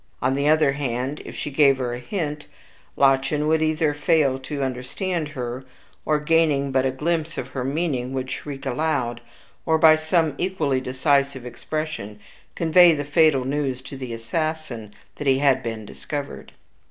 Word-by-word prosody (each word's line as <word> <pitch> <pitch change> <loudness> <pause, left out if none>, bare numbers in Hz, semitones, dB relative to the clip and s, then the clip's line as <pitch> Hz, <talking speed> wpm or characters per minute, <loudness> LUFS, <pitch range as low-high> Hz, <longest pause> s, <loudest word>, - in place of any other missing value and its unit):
On 130 - +1
the 140 +2 0
other 155 -2 +4
hand, 135 0 -3
if - - -8
she 150 - -4
gave 140 -1 +4
her 125 -2 -2
a 120 - -5
hint, 150 - -4 0.5
Lottchen 135 +2 +3
would 160 0 +2
either 155 -1 +1
fail 145 -2 +2
to 140 +1 -4
understand 150 +7 -3
her, 125 +1 -4 0.4
or, 150 -1 +2
gaining 150 -3 +2
but 130 0 +2
a - - +1
glimpse 160 +4 -2
of - - -4
her 130 - -4
meaning, 135 -3 -1
would 130 -1 -3
shriek 140 -1 -6
aloud, 125 -3 -1 0.4
or 160 -1 +2
by 160 0 +7
some 155 0 +1
equally 155 -8 0
decisive 135 0 0
expression 140 -5 -5 0.4
convey 170 0 +6
the 145 -1 -3
fatal 145 -3 +3
news 135 -2 -2
to 135 - -9
the 130 -2 -6
assassin 120 -1 -3 0.3
that 145 - -4
he 135 -1 +4
had 135 -2 +3
been 115 -3 -5
discovered. 140 - -7
140 Hz, 165 wpm, -23 LUFS, 130-155 Hz, 0.5 s, by